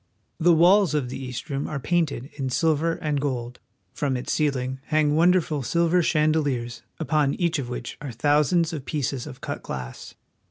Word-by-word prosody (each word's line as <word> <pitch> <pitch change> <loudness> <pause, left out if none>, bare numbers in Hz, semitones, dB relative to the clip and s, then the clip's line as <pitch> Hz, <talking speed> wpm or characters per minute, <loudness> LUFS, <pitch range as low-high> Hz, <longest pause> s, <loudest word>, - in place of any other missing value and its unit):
The 170 +1 +5
walls 180 0 +5
of 135 -5 -1
the 135 - -6
East 125 -2 -6
Room 140 0 -2
are 150 - -3
painted 150 -4 -1
in 135 -3 -3
silver 160 +5 +1
and 150 -3 -2
gold. 125 -3 -3 0.3
From 135 -3 -1
its 125 - -3
ceiling 130 -3 -1
hang 150 -1 +2
wonderful 165 -3 +3
silver 170 +7 +2
chandeliers, 150 -7 0 0.2
upon 150 -3 +1
each 170 -3 0
of 125 -3 -4
which 125 -1 -6
are 145 -3 -5
thousands 150 +7 +2
of 145 -4 -5
pieces 140 -4 -2
of 125 - -10
cut - - -5
glass. 65 -1 -7
145 Hz, 170 wpm, -25 LUFS, 130-160 Hz, 0.3 s, The